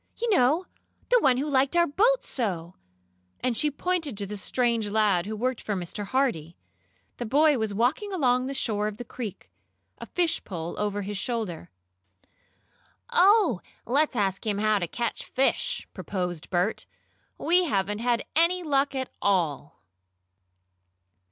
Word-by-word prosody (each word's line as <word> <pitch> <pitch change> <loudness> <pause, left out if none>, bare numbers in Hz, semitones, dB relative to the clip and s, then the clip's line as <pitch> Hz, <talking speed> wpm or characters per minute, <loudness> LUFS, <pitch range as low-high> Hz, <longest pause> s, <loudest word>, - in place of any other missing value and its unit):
"You 470 0 0
know 320 +1 +3 0.4
the - - +5
one 260 - +3
who 280 +4 -1
liked 275 +2 +2
our 345 - +5
boat 450 +12 +2
so," 180 -8 -3 0.7
and 250 -2 0
she 300 - +2
pointed 310 - -1
to 200 - -2
the 210 +2 -6
strange 230 +1 0
lad 205 -4 +2
who 215 - -3
worked 250 +2 -2
for 210 - -2
Mr. 185 +3 -5
Hardee. 195 - -1 0.6
The 240 - -4
boy 290 +2 +4
was 220 -1 -1
walking 250 - 0
along 255 -8 +2
the 275 - -4
shore 210 -5 0
of 210 -1 -5
the 245 - -7
creek, 220 -4 -7 0.5
a - - -8
fish 345 -2 0
pole 170 -3 -5
over 205 -1 -1
his 200 0 -3
shoulder. 215 - -3 1.4
"Oh, 400 - +4 0.2
let's 285 +3 +1
ask 195 -3 0
him 210 -3 -1
how 215 0 +2
to 175 - -2
catch 235 +7 -3
fish!" 485 - 0
proposed 180 -4 -4
Bert. 180 +4 0 0.5
"We 355 +2 +3
haven't 205 - -1
had 240 0 0
any 345 +3 +3
luck 280 -2 +1
at 260 -1 -3
all!" 165 -7 0
240 Hz, 150 wpm, -26 LUFS, 200-295 Hz, 1.4 s, the